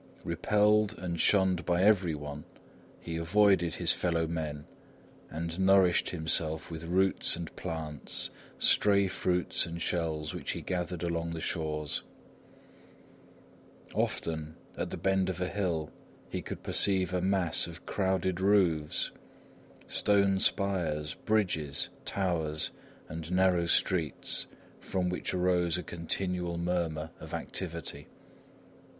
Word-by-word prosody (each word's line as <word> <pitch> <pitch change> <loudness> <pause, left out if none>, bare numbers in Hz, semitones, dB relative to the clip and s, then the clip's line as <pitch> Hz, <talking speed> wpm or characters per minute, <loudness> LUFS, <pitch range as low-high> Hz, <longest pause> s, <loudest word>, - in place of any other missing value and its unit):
Repelled 105 +1 +2
and 85 -2 -4
shunned 95 -3 +3
by 90 +1 +1
everyone, 80 -8 +1 0.6
he 85 -1 -5
avoided 90 -1 +3
his - - +2
fellow 85 -2 +1
men 80 -3 -4 0.6
and 85 +2 -4
nourished 95 -2 +4
himself 80 -1 0
with 80 0 -6
roots 95 +3 +2
and 85 -2 -7
plants, 80 -3 -4 0.3
stray 100 -1 +4
fruits 90 -2 0
and 85 0 -6
shells 80 -3 -1
which - - -3
he - - -5
gathered 90 -1 -3
along 85 -1 -1
the - - -4
shores. 75 -3 -2 1.9
Often, 80 -1 -2 0.2
at - - -3
the - - -5
bend 95 -1 +1
of 90 -1 -3
a 90 - 0
hill, 85 -7 -2 0.4
he - - -3
could - - -7
perceive 95 -2 +2
a 90 - +1
mass 95 -3 +1
of 85 +1 -10
crowded 95 -2 0
roofs, 90 -7 +2 0.7
stone 100 -2 +3
spires, 85 -8 +1
bridges, 90 -10 +1 0.2
towers 80 -5 0 0.4
and 80 +1 -6
narrow 90 -2 +3
streets, 85 -2 0 0.3
from 90 -2 -1
which 90 - -2
arose 90 -1 +2
a 90 - -4
continual 85 0 -2
murmur 85 -3 -1
of - - -6
activity. 85 -5 -5
85 Hz, 120 wpm, -30 LUFS, 80-95 Hz, 1.9 s, nourished